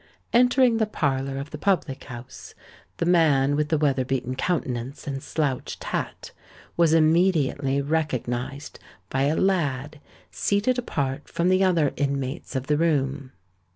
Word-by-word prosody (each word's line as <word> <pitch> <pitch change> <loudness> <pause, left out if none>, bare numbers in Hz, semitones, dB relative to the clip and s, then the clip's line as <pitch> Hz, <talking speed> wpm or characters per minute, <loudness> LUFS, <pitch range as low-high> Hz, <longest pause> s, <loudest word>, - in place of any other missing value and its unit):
Entering 245 0 +4
the 220 -1 +1
parlour 135 -7 -1
of 140 +2 -6
the 150 - -7
public 180 -9 0
house, 125 +1 -10 0.4
the - - -1
man 150 -5 +3
with 150 0 0
the 160 - +2
weather 140 -3 +1
beaten 130 -1 -2
countenance 130 -5 -2
and 135 -1 -4
slouched 140 -5 -3
hat - - -4 0.4
was 170 -2 +4
immediately 155 -4 +2
recognised 140 -3 -3 0.3
by 135 +1 +1
a 150 +3 +1
lad 150 -7 0 0.3
seated 215 +5 +1
apart 140 - -3
from 170 +2 0
the 185 +1 +4
other 170 -6 +2
inmates 140 +1 -2
of 130 0 -2
the 150 +1 +1
room. 140 -4 0
145 Hz, 140 wpm, -25 LUFS, 135-170 Hz, 0.4 s, Entering